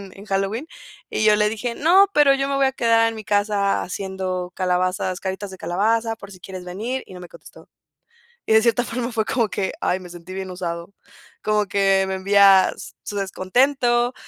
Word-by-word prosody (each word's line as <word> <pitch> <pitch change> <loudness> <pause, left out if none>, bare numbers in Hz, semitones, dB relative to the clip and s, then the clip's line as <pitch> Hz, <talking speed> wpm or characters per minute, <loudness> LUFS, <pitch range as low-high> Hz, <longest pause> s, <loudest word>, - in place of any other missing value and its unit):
en 195 -2 -11
en 200 - -12
Halloween? 195 +8 -2 0.4
Y 220 - -1
yo 210 -1 +6
le 210 0 +2
dije: 235 +2 -4
"No, 375 +6 +5
pero 290 -2 +6
yo 275 0 -1
me 280 - -1
voy 275 -1 +3
a 265 - 0
quedar 230 -2 +3
en 225 - -5
mi 215 - -8
casa 205 -1 +1
haciendo 185 0 -4
calabazas, 185 0 0
caritas 190 +1 -4
de 190 - -11
calabaza 225 +6 0
por 200 -1 -12
si 185 - -13
quieres 185 -1 -8
venir" 225 +9 -4
y 185 - -12
no 180 - -9
me 175 - -10
contestó, - - -16 0.8
y 220 - +2
de 220 - +6
cierta 235 0 +2
forma 245 0 -3
fue 220 -2 -1
como 230 -4 0
que, 190 -2 -2
ay, 185 - 0
me 180 -1 -11
sentí 175 +1 -10
bien 190 -1 -5
usado 170 +1 -5 0.5
como 210 -1 +1
que 195 -1 +2
me 190 - -2
envía 195 0 +5 0.3
su 205 - -5
descontento 240 +6 +1
200 Hz, 200 wpm, -22 LUFS, 185-230 Hz, 0.8 s, yo